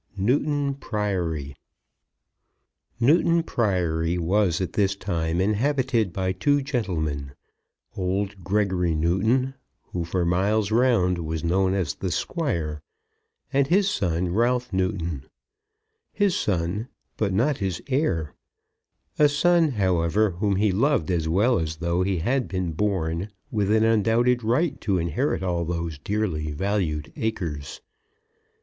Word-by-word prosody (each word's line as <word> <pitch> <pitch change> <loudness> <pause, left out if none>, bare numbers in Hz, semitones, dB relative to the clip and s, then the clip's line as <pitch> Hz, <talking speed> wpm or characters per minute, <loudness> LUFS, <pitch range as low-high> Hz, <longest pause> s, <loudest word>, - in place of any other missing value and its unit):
NEWTON 140 +7 +1
PRIORY. 90 - -2 1.4
Newton 165 +6 +4
Priory 90 - 0
was 90 0 +1
at 95 - -3
this 100 -1 +1
time 85 -4 -2
inhabited 115 +1 +1
by 95 +1 -1
two 145 +9 +1
gentlemen, 80 - -2 0.6
old 95 0 -2
Gregory 95 -4 +1
Newton, 110 +12 +1 0.4
who 85 - -2
for 85 +1 -1
miles 100 +4 +1
round 110 -7 +3
was 80 -1 -3
known 95 +3 +2
as 90 -6 -1
the 95 - -4
Squire; 85 - -2 0.7
and 135 0 +3
his 195 +5 +3
son, 90 - 0
Ralph 120 +2 +1
Newton, 85 -7 -1 0.9
his 200 -3 +1
son, 95 +4 -1 0.3
but 105 -3 0
not 125 +9 +1
his 95 -4 -2
heir; 110 - 0 0.9
a 150 -1 +6
son, 165 +1 +3
however, 95 0 +2
whom 100 +3 0
he 100 +1 +2
loved 110 - +1
as 80 -3 0
well 105 +7 +3
as 80 -1 -3
though 85 +2 -1
he 95 0 0
had 125 +9 0
been 90 -3 -2
born 85 0 -1 0.2
with 105 -2 0
an 110 +1 +4
undoubted 115 +2 +3
right 140 +7 0
to 100 -3 +1
inherit 85 - -1
all 85 -2 0
those 85 -2 -3
dearly 90 -4 -2
valued 80 -3 -2
acres. 80 -10 -4
95 Hz, 125 wpm, -25 LUFS, 85-115 Hz, 1.4 s, a